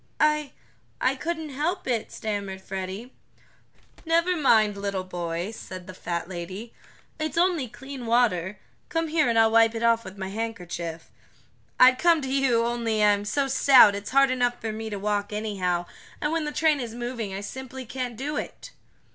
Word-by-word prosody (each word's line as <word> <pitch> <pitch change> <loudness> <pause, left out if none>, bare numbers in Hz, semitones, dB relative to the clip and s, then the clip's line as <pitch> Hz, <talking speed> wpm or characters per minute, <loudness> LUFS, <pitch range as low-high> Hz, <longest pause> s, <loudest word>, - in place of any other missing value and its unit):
"I 300 -1 +2 0.5
I 255 - +2
couldn't 320 +2 -4
help 335 +7 -2
it," 235 -4 -1
stammered 200 -3 -4
Freddie. 195 +6 -6 0.9
"Never 335 +2 +2
mind, 220 -9 +4
little 200 -1 -3
boy," 175 +1 -4
said 185 -5 -9
the 185 - -9
fat 170 -2 -4
lady. 185 +5 -7 0.5
"It's 310 +1 -3
only 340 -6 +2
clean 265 +1 -8
water. 210 -5 +2 0.3
Come 330 -1 -1
here 310 -4 +2
and 230 - +1
I'll 225 0 +5
wipe 225 0 +5
it 225 - -3
off 230 0 +3
with 190 -1 -10
my 190 -1 -4
handkerchief. 180 -6 -5 0.7
I'd 255 0 +7
come 340 -2 +5
to 265 -1 -3
you, 250 -4 +3
only 230 -2 0
I'm 205 -1 +3
so 275 +6 0
stout 260 -5 +7
it's 200 0 -5
hard 275 0 +4
enough 245 -1 0
for 220 - -3
me 220 0 -5
to 205 - -4
walk 205 0 -1
anyhow, 190 -5 -1 0.3
and 300 - -1
when 325 -1 0
the 300 - -2
train 305 0 +2
is 235 -3 -5
moving 240 -4 -4
I 195 - -4
simply 260 +4 -7
can't 245 -1 -4
do 290 +4 -3
it." - - -6
230 Hz, 175 wpm, -26 LUFS, 200-275 Hz, 0.9 s, I'd